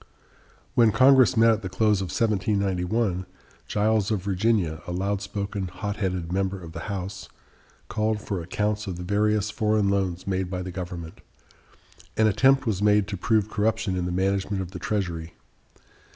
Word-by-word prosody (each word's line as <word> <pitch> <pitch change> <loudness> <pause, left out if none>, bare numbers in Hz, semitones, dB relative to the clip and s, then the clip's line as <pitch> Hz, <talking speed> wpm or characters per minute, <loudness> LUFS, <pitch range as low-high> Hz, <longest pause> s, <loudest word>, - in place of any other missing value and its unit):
When 120 -4 +5
Congress 130 0 +5
met 115 0 +6
at 110 0 0
the 95 - -5
close 105 0 +2
of - - -1
1791, 100 -1 0 0.4
Giles 105 -1 +1
of 105 -5 -1
Virginia, 100 -5 0
a - - -4
loud 95 +2 -1
spoken, 100 -1 -4
hot 100 +4 -5
headed 90 -4 -2
member 95 0 -1
of 85 -2 -10
the 85 - -7
House, 95 -1 -5 0.6
called 110 0 0
for 100 -3 -4
accounts 105 +4 -2
of 95 - -3
the 90 - -6
various 105 +2 +1
foreign 105 -2 +1
loans 95 -3 -1
made 95 -1 -1
by 90 -1 -3
the 90 - -6
government. 85 -3 -7 1.0
An 110 - +4
attempt 130 +5 +4
was 105 -4 -1
made 105 -1 +4
to 100 - -3
prove 105 +2 +1
corruption 110 -2 0
in 90 -1 -1
the 90 - -2
management 95 +2 0
of 90 - -9
the 90 - -7
Treasury. 85 -7 -3
100 Hz, 165 wpm, -25 LUFS, 90-105 Hz, 1.0 s, met